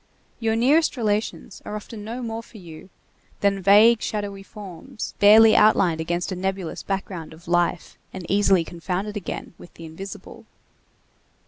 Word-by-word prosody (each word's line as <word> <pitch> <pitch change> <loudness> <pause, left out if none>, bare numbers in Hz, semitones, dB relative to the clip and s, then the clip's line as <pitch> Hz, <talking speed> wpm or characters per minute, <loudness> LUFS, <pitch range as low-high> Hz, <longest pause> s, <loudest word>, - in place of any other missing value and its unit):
Your 225 -1 0
nearest 280 +6 +3
relations 215 -3 -2
are 210 - -6
often 210 0 -8
no 235 +4 -6
more 225 -1 -4
for 230 - -16
you 170 -1 -12 0.5
than 200 -1 +1
vague 215 +4 +6
shadowy 205 -2 -4
forms, 205 +4 -9
barely 215 +2 +7
outlined 185 -6 +4
against 175 +3 -2
a - - -2
nebulous 190 -1 -4
background 190 -5 -5
of 165 +2 -17
life 175 0 -1
and 185 -2 -8
easily 195 -3 +3
confounded 180 +5 -4
again 200 -2 -6
with - - -13
the 165 - -10
invisible. 175 +5 -10
200 Hz, 145 wpm, -23 LUFS, 175-215 Hz, 0.5 s, barely